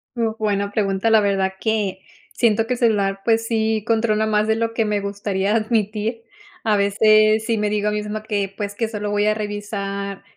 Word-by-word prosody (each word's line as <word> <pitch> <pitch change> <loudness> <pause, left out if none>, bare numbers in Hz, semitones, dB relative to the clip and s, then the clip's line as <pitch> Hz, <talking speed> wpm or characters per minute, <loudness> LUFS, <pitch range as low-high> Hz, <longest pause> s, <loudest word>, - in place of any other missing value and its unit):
Uh, 225 -2 -1
buena 200 -2 -1
pregunta. 200 +1 0
La 220 -1 +5
verdad 195 -2 0
que, 210 -4 -1 0.3
siento 225 -1 +2
que 250 - 0
el 245 - -5
celular 200 -4 +1
pues 225 0 +1
sí 220 -2 0
controla 220 -1 +2
más 210 -1 +1
de 220 - +2
lo 230 0 -1
que 230 - +1
me 210 -1 0
gustaría 200 0 -1
admitir. 220 0 -1 0.4
A 215 -2 +3
veces 215 +2 +4
sí 230 -2 0
me 210 0 0
digo 210 0 0
a 210 - +2
misma 210 0 -3
que, 200 -3 -2
pues, 205 -1 -4
que 225 0 -1
solo 210 -2 -4
voy 205 0 +1
a 215 - +3
revisar 200 -2 -4
210 Hz, 195 wpm, -21 LUFS, 200-220 Hz, 0.4 s, La